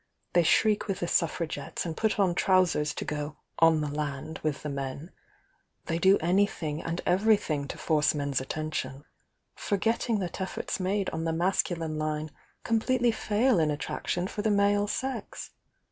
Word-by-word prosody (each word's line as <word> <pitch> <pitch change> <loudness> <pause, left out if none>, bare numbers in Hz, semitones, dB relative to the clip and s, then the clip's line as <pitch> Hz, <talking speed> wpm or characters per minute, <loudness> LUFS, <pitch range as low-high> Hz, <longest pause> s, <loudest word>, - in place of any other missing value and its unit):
they 175 - +5
shriek 210 +6 +3
with 195 -2 -2
the - - +1
Sufifra 165 -1 +1
THE - - -7
YOUNG 165 - -1
DIANA 145 - -4
93 - - -7
gettes, - - -4
and 165 -2 -4
put 220 -1 0
on 190 -3 +3
trousers 175 -5 +2
to - - -4
go 150 0 -4 0.2
'on 165 -1 +5
the 150 - -1
land' 150 +1 -4
with 155 -2 -2
the 150 - -3
men 140 +4 -5 0.4
— - - -43
they 165 0 -1
do 190 +3 +5
anything 170 -3 0
and 165 +1 -3
everything 180 -7 +2
to - - -6
force 150 -1 +2
men's 140 -2 -1
attention 145 -1 -4 0.3
— - - -50 0.2
forgetting 225 +3 0
that 185 -1 -4
efforts 190 - -3
made 195 +1 0
on 160 0 -3
the 165 - +1
masculine 165 -2 0
line 155 0 -2 0.3
completely 240 +2 +2
fail 220 0 +2
in 155 -1 +2
attraction 165 +4 -2
for 210 +2 -4
the 215 - +1
male 205 0 +3
sex. 260 +6 -4
170 Hz, 185 wpm, -28 LUFS, 150-200 Hz, 0.4 s, they